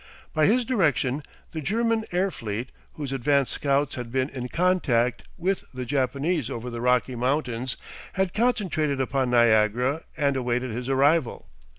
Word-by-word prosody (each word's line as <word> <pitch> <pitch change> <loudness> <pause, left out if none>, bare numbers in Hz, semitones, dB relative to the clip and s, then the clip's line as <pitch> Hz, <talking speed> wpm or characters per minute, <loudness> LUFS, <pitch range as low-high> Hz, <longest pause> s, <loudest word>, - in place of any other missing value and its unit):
By 155 -1 +4
his 240 +4 +3
direction 150 - +1 0.3
the 160 - -4
German 225 +5 0
air 185 +2 +1
fleet, 115 +1 -5 0.2
whose 145 -3 -5
advance 135 +1 +2
scouts 140 0 +1
had 120 -2 -6
been 130 +2 0
in 125 -3 -5
contact 140 -10 +1
with 190 +2 -1
the 125 0 -4
Japanese 140 +2 0
over 125 -1 -5
the 120 0 -5
Rocky 125 +1 +2
Mountains, 125 -1 -1 0.4
had 190 -2 0
concentrated 185 - +1
upon 130 -1 0
Niagara 120 +4 +3 0.2
and 140 -3 +2
awaited 125 -1 -1
his 125 +3 -4
arrival. 140 +1 +2
135 Hz, 150 wpm, -25 LUFS, 125-165 Hz, 0.4 s, By